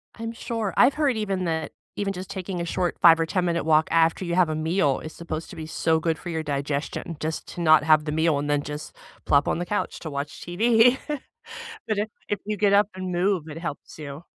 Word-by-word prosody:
I'm 230 0 -5
sure, 225 -3 -3
I've 275 - +5
heard 290 -5 +2
even 195 -4 -1
that 160 -1 -2 0.2
Even 200 -1 -2
just 185 0 -7
taking 185 -1 -4
a - - -2
short 175 +1 -1
5 165 -1 +8
or 165 - +2
10 180 +2 0
minute 170 -1 0
walk 155 0 +4
after 165 +2 +3
you 170 0 -1
have 180 -3 +4
a 155 - -1
meal 155 -3 +1
is 155 - -8
supposed 165 -1 -6
to - - -10
be 160 - -6
so 160 0 +1
good 160 0 0
for 175 - -8
your 160 -1 -2
digestion, 145 +3 -3
just 160 +1 -4
to 175 - -6
not 155 -2 +6
have 155 0 +4
the 150 - -2
meal 160 -1 +2
and 145 +1 -3
then 145 -1 +1
just 150 +1 -7 0.3
plop 140 0 +3
on - - 0
the 175 - -2
couch 205 +3 -2
to 160 - -6
watch 145 +2 -5
TV. 225 +7 +4 0.9
But 215 - 0
if 210 - 0 0.2
if 205 - -1
you 210 0 -2
get 200 0 +3
up 205 +1 +5
and 185 -1 -4
move, 180 0 +1
it 150 - -7
helps 165 -2 -7
you. 145 +1 -7
170 Hz, 240 wpm, -25 LUFS, 155-195 Hz, 0.9 s, 5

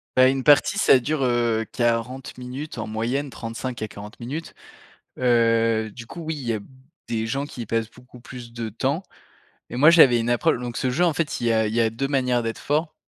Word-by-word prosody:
Bah, 130 0 +7
une 135 0 0
partie 145 -2 +5
ça 130 - +6
dure, 140 +2 -1
heu, 120 -2 +1
40 120 +2 -1
minutes 130 +3 -7
en 110 - -4
moyenne, 120 +6 -2
35 115 +1 -6
à - - -2
40 105 +3 -11
minutes. 145 +8 -6 0.7
Heu, 115 -3 +2
du 120 -2 -9
coup 170 - -8
oui, 160 0 -3
il 130 -4 -7
y - - +2
a - - -2
b - - -14 0.4
des 110 -1 -1
gens 135 +5 -2
qui 130 - -9
y - - -7
passent 115 0 -1
beaucoup 125 0 -16
plus 120 -1 -10
de 115 -1 -4
temps 135 - -1 0.7
et - - -5
moi 150 +5 +6
j'avais 130 -8 +7
une 115 - -2
approche 120 0 +2
donc, 120 -1 -5
ce 130 - 0
jeu, 170 +8 +2
en 170 - +3
fait, 165 -6 -2
il 120 - -1
y - - +3
a 110 -1 +2
il 105 - -3
y 120 - +2
a 110 -1 +3
2 135 +5 -2
manières 125 -3 +1
d'être 115 0 -4
fort 155 +2 -1
120 Hz, 235 wpm, -23 LUFS, 115-135 Hz, 0.7 s, Bah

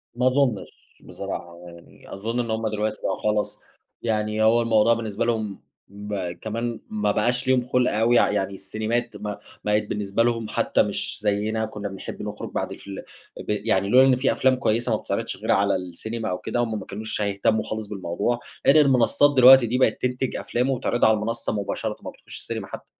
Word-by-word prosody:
ما 125 +1 +2
أظُنّش 130 -5 -1
بصراحة 85 0 -7
يعني، 85 0 -14
أظُن 115 +5 -3
إن 115 -2 -2
هُم 110 0 -1
دلوقتي 105 0 -2
بقوا 95 - -1
خلاص، 105 -1 -1 0.4
يعني 110 -1 0
هو 115 +2 +5
الموضوع 115 0 +4
بالنسبة 115 -1 -2
لهم 110 -4 -2 0.3
م 100 -3 -4
كمان 115 +4 -4
ما 105 -1 0
بقاش 120 +5 +1
ليهم 130 -1 +3
خُلْق 125 0 +2
أوي، 115 +2 +3
ي - - +7
يعني 100 -1 -1
السينيمات 110 +5 -3
ما 105 -1 -5 0.3
بقِت 105 0 +2
بالنسبة 105 +2 0
لهم 115 -2 0
حتى - - +2
مش - - -3
زيّنا، 105 +2 0
كنّا 105 -2 -6
بنحب 95 -1 -8
نخرُج - - -6
بَعد - - -3
الفيل 100 - -8 0.4
ب - - -9
يعني 105 -2 0
لولا 130 +4 +7
إن 130 - +5
في 130 +2 +1
أفلام 130 -1 +3
كويسة 120 -1 0
ما - - +2
بتتعرِضش - - -3
غير - - -2
على 100 0 +3
السينما 100 +6 -4
أو 90 - -1
كده، 120 - -3
هُم 110 -3 -1
ما 95 - -9
كانوش 110 +1 -4
هيهتمّوا 100 +2 +1
خالص 110 -1 -5
بالموضوع، 100 +4 -2 0.3
غير 140 - +7
المنصات 135 +2 +4
دلوقتي 130 -1 +9
دي 120 +3 0
بقت 130 - +2
تنتج 125 0 -1
أفلام 125 +3 -1
وبتعرِضها 120 -3 +2
على 110 - +3
المنصة 115 +2 -3
مباشرةً، 105 +1 -3
ما - - -5
بتخشِّش - - -11
السينما - - -5
حتى. - - -9
110 Hz, 190 wpm, -24 LUFS, 105-120 Hz, 0.4 s, دلوقتي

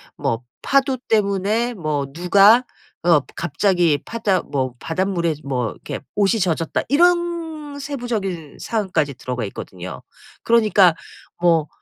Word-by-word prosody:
뭐 115 +2 -2 0.2
파도 270 -1 +2
때문에 210 +3 +1
뭐 155 -7 -2
누가 200 - +5 0.4
어 170 -4 +5 0.2
갑자기 175 -3 +2
파다 210 -6 0
뭐 130 -3 -2
바닷물에 170 -2 -1
뭐 125 -5 -2
이렇게 - - -7 0.2
옷이 210 +2 +2
젖었다." 165 -3 0
이런 345 +3 +4 0.5
세부적인 220 - -4
사항까지 180 - -1
들어가 125 -2 -4
있거든요. 90 -2 -8 0.4
그러니까 210 -7 +4 0.5
뭐 165 -3 +3
185 Hz, 260 characters per minute, -21 LUFS, 155-225 Hz, 0.5 s, 누가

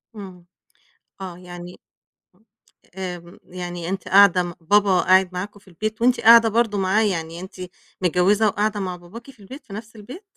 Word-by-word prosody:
إمم. 185 -4 -11 0.8
آه، 185 -2 -7
يعني 175 0 -11 1.2
آمم، 175 -2 -7
يعني 175 -1 -7
أنتِ 195 +1 -5
قاعدة 195 -2 +5
م 175 -1 -6
بابا 195 +2 +3
قاعد 185 0 +4
معاكم 200 +3 -6
في 200 - -29
البيت 215 +5 -5
وأنتِ 250 +1 +3
قاعدة 230 0 +7
برضه 225 -1 0
معاه، 195 +3 +1
يعني 165 -5 -3
أنتِ 185 +1 -10 0.5
متجوِّزة 185 +5 +2
وقاعدة 210 +1 -1
مع 185 -2 -4
باباكِ 210 +9 -13
في 255 - -27
البيت، 255 +9 -12
في 200 - -12
نَفْس 215 +2 -9
البيت؟ 245 - -11
190 Hz, 160 wpm, -22 LUFS, 180-215 Hz, 1.2 s, قاعدة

